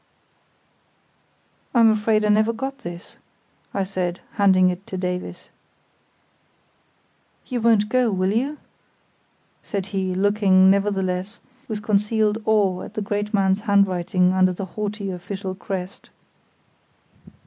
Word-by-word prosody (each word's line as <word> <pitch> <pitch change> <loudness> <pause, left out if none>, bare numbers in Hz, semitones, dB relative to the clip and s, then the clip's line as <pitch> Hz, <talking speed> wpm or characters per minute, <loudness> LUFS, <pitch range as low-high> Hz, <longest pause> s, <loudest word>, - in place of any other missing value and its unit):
"I'm 230 -2 +6
afraid 215 0 +1
I - - +1
never 215 +2 +3
got 270 +4 -5
this!" 175 -4 -9 0.5
I 195 - -1
said, 185 -2 -3
handing 190 -3 +4
it 180 +2 -8
to 190 - -5
Davies. 180 0 -5 1.9
"You 245 -3 -3
won't 220 -2 +3
go, 250 0 +2
will 190 0 0
you?" 275 +7 -1 1.0
said 200 -3 -4
he, 190 -1 -1
looking, 190 -1 +4
nevertheless, 195 0 -1 0.3
with 215 -2 -4
unconcealed 210 +1 +1
awe 200 -4 +2
at 215 - -10
the 215 - -2
great 205 0 -2
man's 195 -1 +2
handwriting 185 -2 +2
under 185 -1 +3
the 190 +2 -5
haughty 210 -2 -4
official 185 +1 -5
crest. 190 0 -6
200 Hz, 115 wpm, -22 LUFS, 185-215 Hz, 1.9 s, I'm